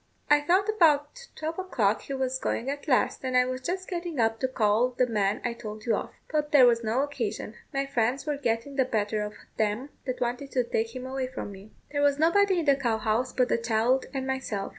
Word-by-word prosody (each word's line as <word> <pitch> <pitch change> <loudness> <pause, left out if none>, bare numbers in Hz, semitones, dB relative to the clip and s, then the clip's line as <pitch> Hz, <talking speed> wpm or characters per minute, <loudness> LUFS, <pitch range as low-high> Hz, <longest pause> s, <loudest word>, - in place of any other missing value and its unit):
I 295 0 +6
thought 365 +7 +2
about 335 +2 +2
twelve 320 +3 -4
o'clock 220 - +1
he 275 - -5
was 260 0 -1
going 260 +2 -1
at 285 +2 -7
last, 260 -1 +2
and 255 -1 +1
I 250 - +5
was 255 0 -4
just 370 +7 -3
getting 345 -5 -4
up 225 0 +2
to 260 - +1
go 260 - -15
call 220 +2 +3
the 255 - +4
man 210 -3 0
I 240 - 0
told 215 -2 -8
you 230 -3 +2
of; - - -4 0.2
but 300 -1 0
there 280 -4 +8
was 235 -1 +3
no 225 +4 +1
occasion. 230 -7 -4 0.2
My 275 0 -1
friends 255 0 0
were 295 -2 -1
getting 245 +1 -2
the 265 - +4
better 215 -3 -1
of 210 0 -5 0.2
them 220 +6 0 0.2
that 255 - -2
wanted 250 +3 -2
to 250 - +2
take 230 0 -2
him 255 0 -5
away 260 0 -3
from 255 -5 -6
me. 195 +2 -12 0.2
There 285 -1 0
was 285 -1 +3
nobody 375 +5 +4
in - - -4
the 280 -2 +5
cow 240 -5 0
house 225 +4 0
but 250 -1 +2
the 235 - +1
child 230 +3 +1
and 265 -1 -3
myself. 265 -7 -3
255 Hz, 235 wpm, -27 LUFS, 225-285 Hz, 0.2 s, there